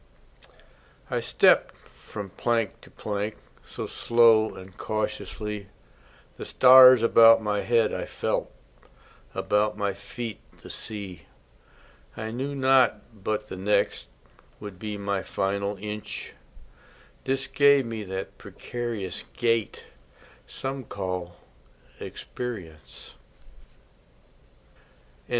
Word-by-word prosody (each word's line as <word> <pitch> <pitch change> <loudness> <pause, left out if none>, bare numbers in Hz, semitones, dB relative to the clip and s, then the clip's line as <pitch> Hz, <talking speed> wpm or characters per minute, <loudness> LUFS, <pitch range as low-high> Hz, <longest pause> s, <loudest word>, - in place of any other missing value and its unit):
I - - +1
stepped - - +3
from 100 -3 -10
plank 115 +1 -1
to - - -15
plank 105 0 -4 0.3
So - - -7
slow 115 -2 +3
and 95 0 -12
cautiously; 105 -1 -4 0.7
The - - -7
stars 130 -2 +8
about 115 -1 +7
my 105 -1 0
head 115 -1 +2
I - - -3
felt, - - -2 0.8
About 105 +1 +1
my 100 -2 -1
feet 110 +3 -7 0.2
the - - -8
sea. 100 -6 -7 0.9
I 110 0 -4
knew 135 +4 -4
not 130 -5 +2
but 105 0 -1
the 95 - -8
next 100 -8 0 0.5
Would 100 -3 -9
be 105 0 -5
my 100 -1 -2
final 100 +1 -2
inch, 105 +1 -6 0.9
This 135 0 0
gave 140 -2 +4
me 115 -2 -5
that 95 0 -6
precarious 115 -6 -5
gait 115 -4 0 0.6
Some 135 0 -5
call 90 -4 -5 0.6
experience. 90 -12 -8 2.1
LIV. - - -28
105 Hz, 100 wpm, -26 LUFS, 100-120 Hz, 2.1 s, stars